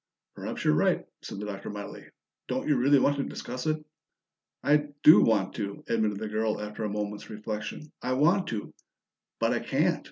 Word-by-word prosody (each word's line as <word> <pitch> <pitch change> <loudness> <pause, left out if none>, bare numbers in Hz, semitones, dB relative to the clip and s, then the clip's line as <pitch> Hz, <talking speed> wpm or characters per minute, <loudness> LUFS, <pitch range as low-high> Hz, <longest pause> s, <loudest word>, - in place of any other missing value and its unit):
"Perhaps - - -5
you're - - +5
right," 75 - +2 0.2
said - - -7
the 105 - -4
Doctor 100 -1 -6
mildly. 105 -1 -7 0.4
"Don't - - -2
you 150 - +4
really 140 +3 +5
want 140 +1 +3
to 140 - 0
discuss 125 +2 -5
it?" 155 0 -1 0.8
"I 150 +1 +4 0.2
do 155 - +10
want 105 -4 +2
to," 100 -2 -4
admitted 110 -3 +1
the 110 +1 -4
girl 110 0 0
after 105 +1 -5
a 105 - -1
moment's 105 0 -4
reflection. 110 +7 -5
"I 125 - -1
want 170 +9 +3
to 110 -3 -4 0.7
but - - +2
I - - +1
can't. - - +1
110 Hz, 185 wpm, -28 LUFS, 105-140 Hz, 0.8 s, do